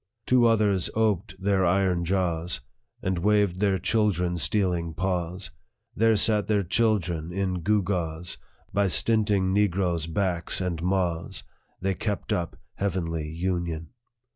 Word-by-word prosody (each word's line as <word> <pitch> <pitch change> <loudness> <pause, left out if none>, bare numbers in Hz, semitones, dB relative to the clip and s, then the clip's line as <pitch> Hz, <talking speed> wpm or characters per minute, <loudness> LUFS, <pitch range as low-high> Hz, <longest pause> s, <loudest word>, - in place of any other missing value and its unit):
" 115 - -54
Two 125 -2 +4
others 105 -5 +2
oped 105 -3 0
their 95 -1 +2
iron 90 -1 +2
jaws, 85 -3 0 0.4
And 95 -1 0
waved 100 -1 +2
their 100 -2 +2
children 90 -3 +1
stealing 90 -5 0
paws; 90 0 -2 0.4
There 115 +1 +4
sat 105 0 +3
their 105 -2 +2
children 90 -5 0
in 90 -1 -2
gewgaws; 90 -4 -1 0.3
By 100 0 +2
stinting 100 -1 +2
negroes' 90 -5 +1
backs 85 0 0
and 90 -3 -2
maws, 90 -2 -1 0.4
They 95 +1 0
kept 105 +2 -2
up 85 -2 -2 0.2
heavenly 85 -5 -2
union. 85 -1 -3
95 Hz, 125 wpm, -26 LUFS, 85-100 Hz, 0.4 s, Two